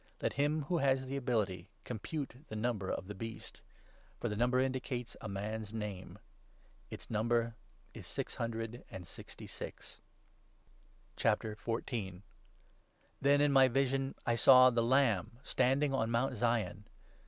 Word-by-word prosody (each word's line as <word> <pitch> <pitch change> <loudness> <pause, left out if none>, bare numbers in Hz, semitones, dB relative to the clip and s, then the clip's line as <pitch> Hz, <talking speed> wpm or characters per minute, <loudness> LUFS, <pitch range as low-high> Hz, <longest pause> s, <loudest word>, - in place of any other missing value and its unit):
Let - - -1
him 150 +2 +1
who 170 +4 0
has 135 -2 +2
the 135 +1 -4
ability 105 -8 -1
compute 130 +4 -4
the 110 - -7
number 110 -3 -1
of - - -2
the 105 - -6
Beast; 115 +3 -8 0.6
for 120 - -1
the 105 - -2
number 125 +3 +2
indicates 130 -2 -2
a 110 - -5
man's 105 +2 -4
name. 105 -4 -5 0.7
Its - - -9
number 115 +1 +1 0.4
is - - -10
six - - -4
hundred 115 0 -3
and 90 - -8
sixty - - -10
six. - - -9 1.2
Then, 110 0 +2 1.9
in 145 -1 +4
my 135 -1 +7
vision, 135 +1 0
I 120 - +2
saw 130 +2 +8
the 120 -1 +2
Lamb 115 -5 +2
standing 135 +3 +2
on 115 -4 +1
Mount 125 +3 +1
i - - -7
Zion. 105 -3 0
120 Hz, 140 wpm, -34 LUFS, 110-130 Hz, 1.9 s, saw